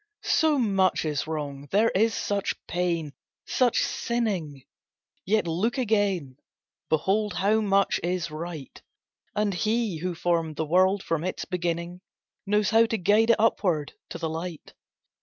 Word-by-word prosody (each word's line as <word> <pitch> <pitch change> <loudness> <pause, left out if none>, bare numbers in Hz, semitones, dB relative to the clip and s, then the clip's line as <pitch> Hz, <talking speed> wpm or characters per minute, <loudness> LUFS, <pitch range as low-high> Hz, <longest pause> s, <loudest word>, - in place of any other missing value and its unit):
"So 315 -2 +3
much 195 -8 +2
is 150 -1 -2
wrong, 145 -3 -5
there 215 +4 +3
is 220 +3 +2
such 200 -1 -1
pain—such 175 - -1
sinning." 190 - -2 0.6
Yet 215 0 +2
look 185 +10 -1
again—behold 200 - -1
how 215 +3 +2
much 200 -2 +2
is 175 -1 -2
right! 155 -2 -7 0.5
And 210 -1 +1
He 215 0 0
who 180 +2 -3
formed 165 -2 0
the 160 - -2
world 185 +4 +3
from 165 -1 -1
its 185 - -3
beginning 175 0 -3 0.5
Knows 210 +1 +2
how 225 +1 +5
to 225 -1 -1
guide 210 +4 +3
it 230 - +7
upward 180 -9 +1 0.2
to - - -6
the 165 -1 -3
light. 165 0 -6
185 Hz, 135 wpm, -26 LUFS, 165-215 Hz, 0.6 s, it